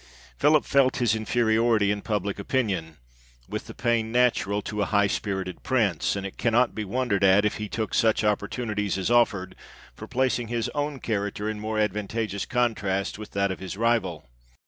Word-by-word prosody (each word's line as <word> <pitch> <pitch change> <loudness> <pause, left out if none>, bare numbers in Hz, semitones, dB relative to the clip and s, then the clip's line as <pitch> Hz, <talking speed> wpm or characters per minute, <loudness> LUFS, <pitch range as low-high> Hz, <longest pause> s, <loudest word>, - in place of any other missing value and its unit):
Philip 150 +1 +3
felt 135 -1 +3
his 120 -4 +2
infe 110 +1 -3
riority 110 -2 +3
in 105 0 -2
public 100 -2 -2
opinion, 95 - -1 0.5
with - - -5
the - - -9
pain 115 -2 0
natural 115 -4 +2
to 105 -1 -3
a - - +2
high 100 0 +3
spirited 95 -2 -3
prince; 105 - +1
and 100 -1 -4
it 95 - -8
cannot 120 +1 +2
be 110 - -3
wondered 105 -1 -1
at 95 +2 +5
if 105 - 0
he 105 -1 -5
took 110 +1 -3
such 110 -6 +3
opportimities 105 -1 -1
as 95 +4 -1
offered, 110 -6 +2 0.4
for - - -10
placing 130 -2 0
his 115 -1 -2
own 145 -1 -2
character 105 -2 -2
in 110 -1 -3
more 110 +1 -3
advantageous 105 0 -2
contrast 105 -5 -1
with 110 - -9
that 100 0 +1
of 95 - -5
his 95 0 -6
rival. 115 +1 0
110 Hz, 180 wpm, -26 LUFS, 100-120 Hz, 0.5 s, at